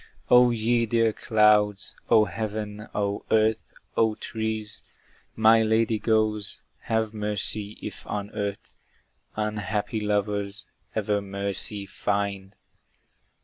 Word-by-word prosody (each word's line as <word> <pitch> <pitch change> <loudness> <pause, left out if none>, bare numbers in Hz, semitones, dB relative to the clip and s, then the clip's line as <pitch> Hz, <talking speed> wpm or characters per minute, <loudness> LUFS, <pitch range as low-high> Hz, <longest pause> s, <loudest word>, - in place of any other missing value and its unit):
O 125 0 +8
ye 115 0 +1
dear 115 -1 +2
clouds! 105 -3 +3
O 110 -2 +6
heaven! 105 +1 -5
O 100 -1 -1
earth! 110 0 +2 0.2
O 110 -1 +2
trees! 110 -1 -4 0.5
My 110 +1 +6
lady 110 0 +2
goes! 110 -2 +1 0.3
Have 110 -1 +1
mercy, 105 0 -1
if - - -7
on 105 0 -4
earth 100 -1 -4 0.6
Unhappy 105 0 -2
lovers 105 0 -1 0.3
ever 105 -1 0
mercy 100 +1 -4
find! 100 0 -2
105 Hz, 105 wpm, -26 LUFS, 100-110 Hz, 0.6 s, O